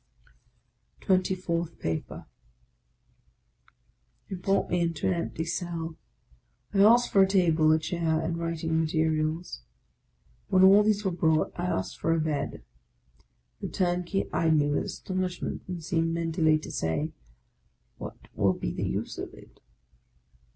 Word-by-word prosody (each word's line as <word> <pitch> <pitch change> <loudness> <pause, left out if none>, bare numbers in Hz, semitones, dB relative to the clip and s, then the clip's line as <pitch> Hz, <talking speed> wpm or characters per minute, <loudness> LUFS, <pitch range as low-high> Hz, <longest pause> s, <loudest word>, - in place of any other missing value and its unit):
TWENTY 185 -1 +2
FOURTH 170 -2 -3
PAPER 80 -1 -4 2.2
brought 195 +2 +1
me 175 0 +2
into 165 -2 -1
an - - +3
empty 165 -1 -3
cell. 170 -1 -4 0.8
I 195 - +1
asked 235 +4 +6
for 200 - +4
a - - +9
1 190 - +6
table, 165 -5 +3
a 155 - +5
chair, 160 0 -1
and 170 - -2
writing 165 -1 -1
materials. 155 - -1 0.9
When 185 -1 +4
all 195 +2 +8
these 210 -1 +1
were 190 - +2
brought, 160 -2 +1
I 175 - -3
asked 95 - -3
for 165 - +1
a 165 - +1
bed. 155 -2 -2 1.0
The - - -4
turnkey 180 +1 0
eyed 160 -1 +3
me 145 0 +2
with 145 - 0
astonishment, 185 -1 -3
and 180 -3 -5
seemed 165 0 0
mentally 165 -2 +2
to 155 - -8
say, 145 - -1 0.4
" - - -43
What - - -7 0.2
will - - +2
be - - -4
the - - -2
use - - -4
of - - -6
it? - - -17
165 Hz, 145 wpm, -28 LUFS, 160-185 Hz, 2.2 s, a